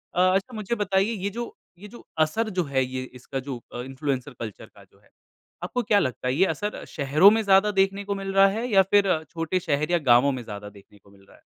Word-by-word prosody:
अ, - - 0 0.2
अच्छा 195 +6 -2
मुझे 215 +2 -3
बताइए 200 0 +1
ये 200 - 0
जो, 235 +3 -6 0.2
ये 210 - -10
जो 240 - -14
असर 215 +9 +1
जो - - +3
है 135 -3 0
ये 130 0 -5
इसका 130 +2 -6
जो 130 -3 -7
अ, 120 - -5
इन्फ्लुएंसर 135 +1 -4
कल्चर 110 -4 -7
का - - -16
जो - - -26
है, - - -28 0.5
आपको 245 - -2
क्या 205 -1 +3
लगता 125 -3 -2
है 125 - +1
ये 185 +6 +4
असर 205 +5 -3
शहरों 150 +6 +5
में 225 - +2
ज़्यादा 200 +1 +4
देखने 195 0 +1
को 200 - -2
मिल 195 0 -5
रहा 195 0 +6
है 220 +5 -2
या 195 -2 +6
फ़िर 200 -2 +4 0.2
छोटे 165 +2 -2
शहर 155 -2 -1
या 175 - +4
गाँवों 130 +4 +5
में 125 -2 -5
ज़्यादा 105 -2 -8
देखने 105 0 -18
को 100 - -23
मिल 100 - -21
रहा - - -20
है? - - -27
175 Hz, 245 wpm, -25 LUFS, 130-200 Hz, 0.5 s, रहा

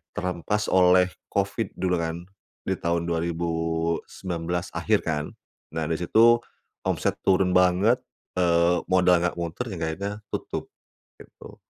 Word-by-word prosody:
terhempas 90 +4 -2
oleh 90 0 +5 0.2
Covid 100 +2 -2
dulu 90 -1 0
kan, 85 +1 -3 0.4
di - - 0
tahun 85 0 -1
2019 85 +1 -2
akhir - - +2
kan. 75 -2 -2 0.5
Nah, 80 -1 -2
di 80 - 0
situ 115 +7 +5 0.5
omset - - 0
turun 95 -1 +4
banget, 90 +6 +4 0.4
eee, 85 -1 +3
modal 90 -1 +5
enggak 90 0 -1
muter 85 +8 -3
yang 85 - -6
akhirnya 100 +6 -3 0.2
tutup, - - -4 0.5
gitu. - - -14
90 Hz, 125 wpm, -25 LUFS, 85-95 Hz, 0.5 s, oleh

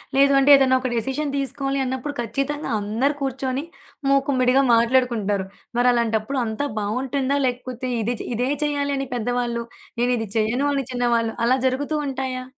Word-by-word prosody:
లేదు 275 0 +5
అంటే 280 +2 +5
ఏదన్నా 260 -1 +4
ఒక 255 - -2
డెసిషన్ 270 +5 -2
తీసుకోవాలి 275 0 -2
అన్నప్పుడు 260 +3 -3
ఖచ్చితంగా 275 +5 -3
అందరూ 235 +8 0
కూర్చొని, 265 +1 -2 0.5
మూకుమ్మడిగా 270 -1 +3
మాట్లాడుకుంటారు. 230 -5 +2 0.3
మరలాంటప్పుడు 235 +1 +1
అంతా 225 +6 -2
బావుంటుందా? 260 +6 -1
లేకపోతే 255 0 -3
ఇది 235 +3 -1
చే - - -6
ఇదే 250 +3 0
చేయాలని 285 -2 -1
పెద్దవాళ్ళు, 240 0 -1 0.4
నేనిది 240 -3 +1
చేయను 240 +6 +1
అని 275 -3 -1
చిన్నవాళ్ళు 235 -2 +1
అలా 255 +2 +3
జరుగుతూ 285 +4 -1
ఉంటాయా? 260 -1 -3
255 Hz, 135 wpm, -23 LUFS, 235-275 Hz, 0.5 s, లేదు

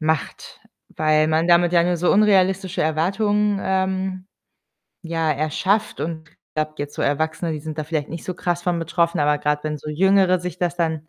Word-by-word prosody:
macht, 160 -1 -3 0.4
weil 155 0 +3
man 160 +1 +1
damit 175 0 +4
ja 170 -1 +5
nur 175 0 +1
so 180 - +2
unrealistische 190 -2 +2
Erwartungen, 200 +6 +1
ähm, 190 0 -1 0.8
ja, 165 -2 0
erschafft. 155 +8 -1
Und 160 0 -5
ich - - -30 0.2
glaube 155 0 -2
jetzt 145 0 -5
so - - -6
Erwachsene, 160 +3 -1
die 155 - -5
sind 155 +1 -7
da 155 - -2
vielleicht 150 -2 -3
nicht 165 -1 -6
so 185 - -4
krass 175 -1 -2
von 175 -1 0
betroffen, 170 +1 0
aber 150 0 +2
grad 150 0 -1
wenn 150 -1 -3
so 150 - -9
Jüngere 190 +2 +3
sich 180 0 -6
das 175 -1 -1
dann 160 -2 -2
170 Hz, 190 wpm, -22 LUFS, 155-185 Hz, 0.8 s, ja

